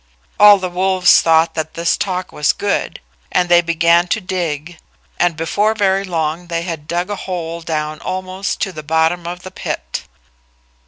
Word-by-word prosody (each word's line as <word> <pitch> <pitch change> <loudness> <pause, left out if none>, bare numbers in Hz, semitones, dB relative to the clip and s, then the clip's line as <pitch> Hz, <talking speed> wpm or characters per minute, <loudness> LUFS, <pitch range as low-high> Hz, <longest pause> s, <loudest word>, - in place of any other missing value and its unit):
All 205 0 +9
the 185 -1 -3
wolves 185 0 +4
thought 165 0 +3
that 160 -1 -4
this 170 0 +1
talk 185 -2 -3
was 150 -1 +1
good, 205 - -2 0.3
and 180 -1 +1
they 175 0 +6
began 170 +1 +3
to 220 - 0
dig, 175 -4 -4 0.4
and 175 -2 +1
before 205 +7 0
very 195 -2 +1
long 165 -1 -2
they 170 -1 -2
had 165 -4 -6
dug 175 +3 -2
a - - -1
hole 170 -3 -5
down 155 -1 -3
almost 185 +2 -4
to 195 - -1
the 155 - -8
bottom 160 +3 0
of 180 +1 -6
the 185 - -8
pit. - - -5
175 Hz, 170 wpm, -17 LUFS, 165-185 Hz, 0.4 s, All